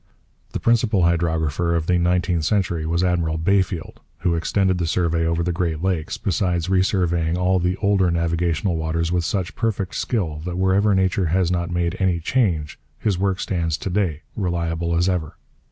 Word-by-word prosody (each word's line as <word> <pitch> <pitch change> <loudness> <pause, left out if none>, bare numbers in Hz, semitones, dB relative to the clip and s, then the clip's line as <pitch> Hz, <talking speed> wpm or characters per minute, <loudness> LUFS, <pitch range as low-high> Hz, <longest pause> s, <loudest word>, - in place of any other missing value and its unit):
The - - -2
principal 115 -5 +2
hydrographer 85 -1 +1
of 80 -1 0
the 90 +1 +2
nineteenth 90 -1 +1
century 85 -3 0
was 85 +2 +1
Admiral 85 -3 0
Bayfield, 90 0 0 0.2
who 85 - +1
extended 95 +2 +1
the 85 - 0
survey 85 -1 +1
over 85 +1 0
the 90 - 0
Great 85 -2 -2
Lakes, 90 -5 -1
besides 90 -2 -1
re 95 -1 +4
surveying 85 -3 +1
all 90 +1 +2
the 90 +1 0
older 100 -3 +3
navigational 85 +1 0
waters 80 +1 -1
with 90 -1 +1
such 90 -1 -2
perfect 105 -5 -2
skill 80 -11 -2
that 90 0 -4
wherever 95 +2 +3
nature 95 -1 +1
has 90 +1 +1
not 85 -1 -1
made 85 0 -1
any 95 -3 +1
change 85 - 0 0.2
his 100 -1 -1
work 95 -1 0
stands 85 -6 -1
to 95 - -4
day, 90 -5 -1
reliable 85 -3 -1
as 85 +2 +2
ever. 90 -5 -2
85 Hz, 175 wpm, -22 LUFS, 85-95 Hz, 0.2 s, re